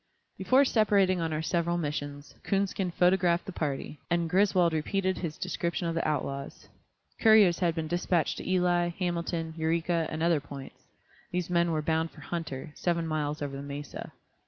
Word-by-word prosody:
Before 270 Hz, +2 st, +4 dB
separating 200 Hz, -6 st, +3 dB
on 165 Hz, -1 st, -1 dB
our 155 Hz, 0 st, -2 dB
several 170 Hz, +1 st, 0 dB
missions, 145 Hz, -2 st, -4 dB
Coonskin 195 Hz, -1 st, 0 dB
photographed 180 Hz, 0 st, +2 dB
the -, -, -5 dB
party, 150 Hz, -2 st, -3 dB
and 170 Hz, -1 st, +1 dB
Griswold 185 Hz, -3 st, +3 dB
repeated 185 Hz, +4 st, 0 dB
his 160 Hz, -4 st, -4 dB
description 175 Hz, -1 st, -2 dB
of 165 Hz, -, -1 dB
the 165 Hz, -, -1 dB
outlaws. 140 Hz, -2 st, -3 dB, 0.5 s
Couriers 215 Hz, -6 st, +6 dB
had 170 Hz, -3 st, +1 dB
been 160 Hz, -1 st, -2 dB
dispatched 175 Hz, 0 st, 0 dB
to -, -, -6 dB
Ely, 180 Hz, -1 st, +2 dB
Hamilton, 170 Hz, -2 st, -2 dB
Eureka, 165 Hz, +1 st, 0 dB
and 155 Hz, +1 st, -3 dB
other 170 Hz, -2 st, +3 dB
points; 140 Hz, -1 st, -10 dB, 0.5 s
these 180 Hz, 0 st, -3 dB
men 170 Hz, -1 st, +3 dB
were 155 Hz, -1 st, -1 dB
bound 160 Hz, +1 st, +1 dB
for 150 Hz, -, -15 dB
Hunter, 155 Hz, -3 st, -5 dB
seven 170 Hz, 0 st, -1 dB
miles 150 Hz, -2 st, -2 dB
over 140 Hz, -1 st, -4 dB
the 135 Hz, -, -5 dB
mesa. 140 Hz, 0 st, -7 dB
170 Hz, 165 wpm, -29 LUFS, 155-180 Hz, 0.5 s, Couriers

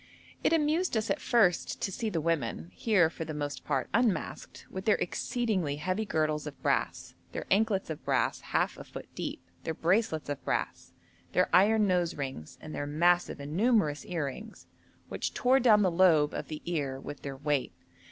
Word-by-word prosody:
It -, -, +3 dB
amused 320 Hz, -2 st, +2 dB
us 220 Hz, +1 st, -1 dB
at -, -, -1 dB
first 195 Hz, -8 st, +2 dB
to 195 Hz, -, -2 dB
see 220 Hz, +4 st, -2 dB
the 170 Hz, -, -1 dB
women, 140 Hz, -, -2 dB
here 195 Hz, -, +3 dB
for 160 Hz, 0 st, -6 dB
the 155 Hz, -1 st, -6 dB
most 145 Hz, -1 st, -4 dB
part 135 Hz, -3 st, -1 dB
unmasked, 220 Hz, -7 st, -1 dB
with 190 Hz, +1 st, -7 dB
their 215 Hz, -, +5 dB
exceedingly 190 Hz, -, -1 dB
heavy 185 Hz, +8 st, -2 dB
girdles 155 Hz, -4 st, 0 dB
of 145 Hz, -3 st, -8 dB
brass, -, -, -1 dB, 0.2 s
their -, -, -4 dB
anklets 195 Hz, -3 st, +2 dB
of 155 Hz, -, -7 dB
brass -, -, 0 dB
half -, -, -1 dB
a -, -, -7 dB
foot -, -, -9 dB
deep, 85 Hz, -, -5 dB, 0.2 s
their 160 Hz, -, -3 dB
bracelets 175 Hz, -2 st, +1 dB
of 145 Hz, -1 st, -4 dB
brass, -, -, -2 dB, 0.4 s
their -, -, +3 dB
iron 210 Hz, +3 st, +5 dB
nose 180 Hz, -3 st, +1 dB
rings, 135 Hz, -, -6 dB
and 155 Hz, -, -8 dB
their 145 Hz, -, -3 dB
massive 175 Hz, +4 st, +2 dB
and 145 Hz, +2 st, -6 dB
numerous 205 Hz, -9 st, +2 dB
earrings 175 Hz, -, -5 dB, 0.4 s
which -, -, -3 dB
tore 255 Hz, +2 st, +4 dB
down 215 Hz, -5 st, +5 dB
the 185 Hz, -, +3 dB
lobe 165 Hz, -4 st, +4 dB
of -, -, -4 dB
the 155 Hz, -1 st, -7 dB
ear 145 Hz, -6 st, -2 dB
with 145 Hz, +1 st, -8 dB
their 135 Hz, -1 st, -6 dB
weight. 145 Hz, -1 st, 0 dB
170 Hz, 180 wpm, -30 LUFS, 150-215 Hz, 0.4 s, their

